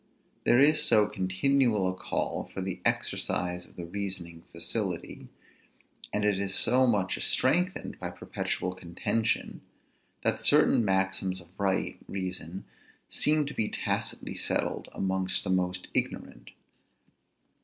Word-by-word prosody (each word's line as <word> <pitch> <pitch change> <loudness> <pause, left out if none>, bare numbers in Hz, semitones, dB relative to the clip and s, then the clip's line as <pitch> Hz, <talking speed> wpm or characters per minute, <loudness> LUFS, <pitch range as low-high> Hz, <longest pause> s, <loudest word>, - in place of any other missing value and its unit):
There 120 - +5
is 150 +3 +6
so 105 -2 +5
continual 105 +2 +1
a 95 - 0
call 95 - -2
for - - -6
the 95 -1 -4
exercise 90 0 -1
of - - -20
the 85 - -6
reasoning 85 -3 -5
facility; 85 +2 -3 0.8
and 105 0 0
it 100 -2 +2
is 100 -1 0
so 130 +1 +5
much 100 -5 +1
strengthened 180 +8 +1
by - - -4
perpetual 90 0 -3
contention, 95 +5 -2 0.6
that - - 0
certain - - +5
maxims 95 -1 0
of 85 -2 -15
right 95 -2 0
reason 95 -2 -5 0.4
seem 150 0 +2
to 150 - -6
be 110 - 0
tacitly - - -2
settled - - -1
amongst 95 -1 -1
the 95 - -2
most 90 0 0
ignorant. - - -3
95 Hz, 125 wpm, -29 LUFS, 90-110 Hz, 0.8 s, is